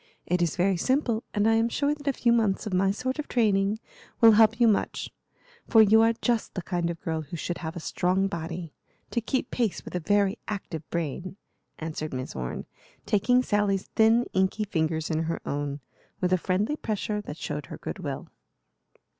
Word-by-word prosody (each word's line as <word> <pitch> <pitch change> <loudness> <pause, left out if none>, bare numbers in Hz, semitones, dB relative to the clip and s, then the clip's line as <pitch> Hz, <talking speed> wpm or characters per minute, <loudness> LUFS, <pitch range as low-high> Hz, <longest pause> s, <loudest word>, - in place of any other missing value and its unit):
It 180 0 0
is 170 -3 +1
very 185 +1 +2
simple, 245 - +1
and 210 0 +1
I 225 - +5
am 225 +1 +3
sure 285 +4 +1
that 295 -1 -10
a - - +5
few 235 -1 +2
months 215 -5 +1
of 210 - -4
my 190 +1 +3
sort 255 +8 -2
of 300 - -3
training 205 -3 +2 0.4
will 230 -1 +9
help 220 +1 +5
you 235 - +6
much; 215 - 0 0.6
for 225 - +5
you 220 +2 +6
are 225 +1 +4
just 235 -3 0
the 185 - -3
kind 175 -1 -1
of 170 -1 -4
girl 160 -1 -2
who 155 +3 -7
should 175 +2 -3
have 160 0 -5
a - - -4
strong 180 +4 +1
body, 170 -3 -5 0.4
to 235 - 0
keep 255 +2 -2
pace 230 -6 -1
with - - -8
a 180 - 0
very 200 +4 +2
active 190 -6 -4
brain," 170 +3 -3 0.4
answered 155 -2 -4
Miss 130 0 -5
Orne, 60 -1 -4 0.4
taking 245 +5 +3
Sally's 205 -4 0
thin, 225 +2 +5
inky 190 +3 +1
fingers 160 -5 -1
in 160 0 +1
her 165 - -2
own, 145 0 -3 0.4
with 180 0 +1
a - - +5
friendly 200 - 0
pressure 210 -2 -2
that 155 -6 -8
showed 150 -3 -4
her - - -8
good - - -6
will. - - -5
195 Hz, 195 wpm, -27 LUFS, 170-225 Hz, 0.6 s, will